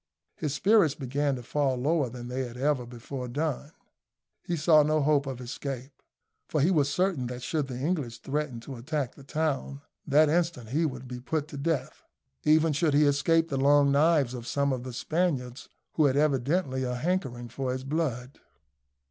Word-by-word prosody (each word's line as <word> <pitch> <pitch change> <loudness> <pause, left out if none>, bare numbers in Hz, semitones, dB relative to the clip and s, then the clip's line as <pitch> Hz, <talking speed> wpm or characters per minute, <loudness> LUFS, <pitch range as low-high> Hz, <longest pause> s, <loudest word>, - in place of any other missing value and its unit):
His 150 -2 -3
spirits 190 -2 +4
began 140 +1 -1
to 125 - -7
fall 140 +1 0
lower 145 +1 +1
than 120 0 -8
they 125 +2 -3
had 120 0 -9
ever 135 -2 0
before 125 +2 -6
done. 145 +2 -3 0.7
He 175 - -2
saw 155 0 +6
no 155 +1 +2
hope 145 -1 +2
of 130 -2 -5
escape; 130 +1 -6 0.6
for 155 - 0
he 160 +7 +3
was 145 -5 +3
certain 175 -5 0
that 125 0 -6
should 140 +3 -1
the 125 -2 -6
English 140 -6 -2
threaten 140 -3 -3
to 130 +1 -8
attack 135 +1 -3
the 140 - -15
town, 140 -2 -2 0.3
that 150 +2 +5
instant 165 -7 0
he 155 +6 +1
would 130 -2 -7 0.2
put 155 -2 0
be - - -20
to - - -7
death, 150 0 -2 0.4
even 155 +1 +4
should 150 0 +2
he 150 +1 +5
escape 165 +4 +2
the 135 - -1
long 140 +1 +4
knives 145 -3 +3
of 120 -2 -7
some 140 -1 +1
of 125 - -3
the 130 0 -7
Spaniards 140 -4 -2 0.2
who 155 - +3
had 140 -1 +2
evidently 140 0 +1
a 125 -1 -2
hankering 130 -5 -2
for 130 +1 -3
his 130 0 -4
blood. 135 -3 -3
140 Hz, 185 wpm, -28 LUFS, 130-155 Hz, 0.7 s, saw